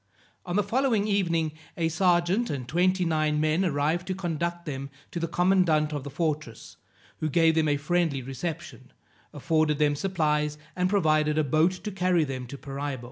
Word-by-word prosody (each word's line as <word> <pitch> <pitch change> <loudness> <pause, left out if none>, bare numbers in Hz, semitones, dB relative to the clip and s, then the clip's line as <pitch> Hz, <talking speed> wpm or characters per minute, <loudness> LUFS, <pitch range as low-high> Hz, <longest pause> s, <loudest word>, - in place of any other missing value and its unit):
On 175 - -2
the 205 - +3
following 235 -4 +1
evening, 170 -6 +1 0.3
a 165 -1 +1
serjeant 175 +6 +2
and 130 -4 -4
twenty 180 +5 +2
nine 155 -2 +1
men 155 +4 +2
arrived 160 +1 0
to 185 - -2
conduct 175 -1 -3
them 140 -2 -5 0.2
to 170 - -4
the 165 - -1
commandant 170 -4 +2
of 145 -2 -3
the 140 - -6
fortress, 150 -5 -4 0.4
who 155 - -1
gave 165 +2 +4
them 160 -1 +2
a 145 -1 +2
friendly 155 -2 0
reception, 135 0 -6 0.4
afforded 155 0 +1
them 145 -1 +2
supplies, 150 -4 0 0.2
and 180 0 +1
provided 155 -6 +2
a 155 - +3
boat 155 +6 +2
to 210 +3 -6
carry 180 -3 +2
them 130 -3 -5
to 140 - -8
Paraibo. 140 -1 -5
160 Hz, 175 wpm, -27 LUFS, 150-180 Hz, 0.4 s, gave